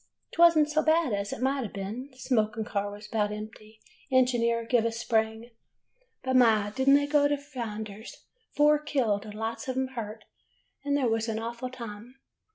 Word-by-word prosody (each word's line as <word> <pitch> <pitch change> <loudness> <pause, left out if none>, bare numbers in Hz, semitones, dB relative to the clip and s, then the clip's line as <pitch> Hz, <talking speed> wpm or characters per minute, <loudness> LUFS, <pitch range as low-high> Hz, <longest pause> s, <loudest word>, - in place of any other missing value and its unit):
" - - -50
'T 335 - -1
was 340 -1 +7
n't 300 -1 +4
so 305 +1 +1
bad 315 -5 +2
as 200 0 -2
it 245 - -4
might 270 0 +1
ha' 220 - -6
been. 210 +7 -6
Smoking 225 -4 0
car 205 -1 -2
was 205 +1 -10
about 210 -1 0
empty, 215 +1 -9 0.3
engineer 235 -3 +2
give 240 -1 +2
a 230 - 0
spring, 225 0 -1 0.7
but, 260 0 0
my! 220 -5 +4
did 265 +4 +1
n't 275 - +8
they 285 0 +3
go 290 0 +3
to 290 0 0
flinders! 220 -6 -7 0.3
Four 295 0 +5
killed, 250 -9 0
and 210 -1 -9
lots 225 +2 -4
of 260 0 -3
'em 260 0 0
hurt, 220 -4 -7 0.6
and 285 0 +1
there 265 -3 +1
was 225 0 0
an 220 - -2
awful 235 +3 -4
time 235 -1 -9
235 Hz, 195 wpm, -28 LUFS, 215-265 Hz, 0.7 s, n't